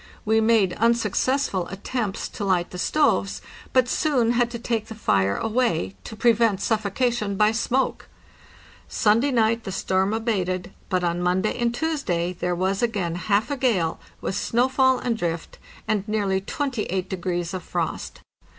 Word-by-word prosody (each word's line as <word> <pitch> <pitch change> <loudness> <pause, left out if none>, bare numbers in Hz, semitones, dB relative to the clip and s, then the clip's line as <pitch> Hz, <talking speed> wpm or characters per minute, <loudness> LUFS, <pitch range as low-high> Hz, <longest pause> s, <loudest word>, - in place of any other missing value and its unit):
We 220 +1 +3
made 220 -5 +3
unsuccessful 235 -2 +1
attempts 200 +1 -3
to 205 - -6
light 185 -3 +1
the 180 - -6
stoves, 290 -6 +1 0.3
but 255 -1 +3
soon 250 -5 +2
had 240 0 +2
to 240 - -5
take 230 -2 -2
the 220 - -8
fire 100 - +1
away, 215 - 0
to - - -7
prevent 225 -3 +3
suffocation 215 0 0
by 210 +2 +4
smoke. 240 +4 -1 0.8
Sunday 225 +6 +2
night 230 -2 +2
the 195 - -5
storm 190 +1 0
abated, 190 -5 -1 0.2
but 185 -1 0
on 175 0 0
Monday 185 +4 +1
and 240 -1 0
Tuesday 240 - -1
there 180 0 -2
was 190 +2 0
again 205 -8 0
half 205 +7 0
a 285 - -1
gale, 200 -11 +1 0.2
with - - -2
snowfall 260 +4 +2
and 245 -2 -1
drift, 165 -1 -3 0.3
and 210 -3 +1
nearly 200 -3 0
28 210 - -2
degrees 175 -2 -3
of 185 - -3
frost. - - -4
215 Hz, 150 wpm, -24 LUFS, 185-235 Hz, 0.8 s, by